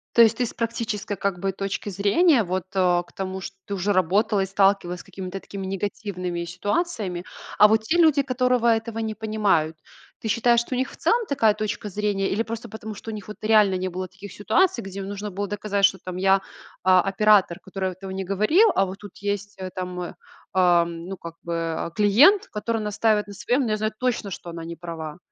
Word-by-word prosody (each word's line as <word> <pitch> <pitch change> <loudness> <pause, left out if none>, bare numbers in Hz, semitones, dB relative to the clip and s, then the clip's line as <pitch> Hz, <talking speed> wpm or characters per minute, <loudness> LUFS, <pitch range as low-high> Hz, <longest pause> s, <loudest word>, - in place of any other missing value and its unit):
То 235 - +7
есть, 225 -1 +5
ты - - +3
с - - -6
практической 225 -3 -3
как 195 -1 -2
бы 195 +1 -1
точки 195 +2 -4
зрения, 220 - +3
вот, 185 -1 -2
э, 180 -2 +3
к - - -20
тому 190 0 -4
ж - - -6
ты 200 - -5
уже 200 +2 0
работала 195 +3 +2
и - - +1
сталкивалась 195 -2 +2
с - - -10
какими-то 190 0 -7
такими 195 0 -7
негативными 190 -2 -3
ситуациями, 205 - -2 0.3
а 210 - +8
вот 220 0 +3
те 315 +10 +1
люди, 315 -4 +5
которого 250 -2 +1
этого 225 0 +1
не 220 -1 -3
понимают. 205 -8 0 0.4
Ты - - -5
считаешь, 235 +2 +3
что 235 +2 -3
у - - -2
них 260 +2 -1
в - - -13
целом 470 0 +2
такая 225 -6 +3
точка 210 0 -4
зрения 205 0 -1
или 215 +4 0
просто 230 +1 -6
потому, 220 0 -7
что 225 +2 -8
них 210 -2 -7
вот 210 - -8
реально 215 -3 +4
не 185 0 -2
было 185 +1 -4
таких 190 +1 -11
ситуаций, 375 - +1
где 195 0 -6
нужно 200 +1 -5
было 200 +2 -3
доказать, 205 0 +1
что 190 - +2
там 185 -1 -7
я, 195 +1 +3 0.4
а, 185 0 +6
оператор, 195 -2 +3
который 190 -1 -4
этого 190 +1 -9
не 190 0 -4
говорил, 215 - +4
а 195 - +3
вот 190 +1 -7
тут 205 -3 -12
есть, 205 0 -3
э, 185 -1 -5
там, 180 -1 -5 0.4
ам, 170 -2 +2
ну, 195 - -5
как 170 -1 -9
бы, 170 - -4
э, 165 0 -2
клиент, 245 - +5
который 225 +1 -2
настаивает 210 0 +1
на 205 - -9
своем, 245 +7 0
но 235 -5 -1
я 215 - +1
знаю 215 0 -1
точно, 250 -5 -1
что 180 -2 -7
она 165 -1 -7
не 170 0 -6
права. 165 -3 -7
200 Hz, 215 wpm, -24 LUFS, 185-220 Hz, 0.4 s, а